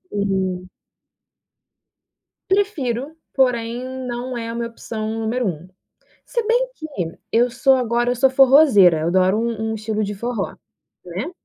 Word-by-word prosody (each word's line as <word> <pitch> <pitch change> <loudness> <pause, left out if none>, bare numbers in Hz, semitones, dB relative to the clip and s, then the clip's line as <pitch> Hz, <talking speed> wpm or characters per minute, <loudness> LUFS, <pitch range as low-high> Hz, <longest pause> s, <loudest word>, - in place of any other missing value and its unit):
Uhum. 190 -2 -1 1.8
Prefiro, 310 - -1 0.2
porém 240 -2 0 0.2
não 245 +1 -4
é 230 -1 -4
a 230 - -5
minha 235 0 -2
opção 225 -1 -6
número 230 +2 -1
1. 170 -1 -5 0.6
Se 470 -2 -2
bem - - +2
que, 315 - -8 0.5
eu 240 +2 +3
sou 265 +3 +3
agora 240 -1 +1
eu - - -1
sou 265 +2 +4
forrozeira, 260 - +6
eu 160 - -1
adoro 185 +3 +3
um 225 -1 -2
um - - -2
estilo 215 0 -2
de 205 0 -3
forró, 230 0 -3 0.5
né. 185 - -5
235 Hz, 140 wpm, -21 LUFS, 205-260 Hz, 1.8 s, forrozeira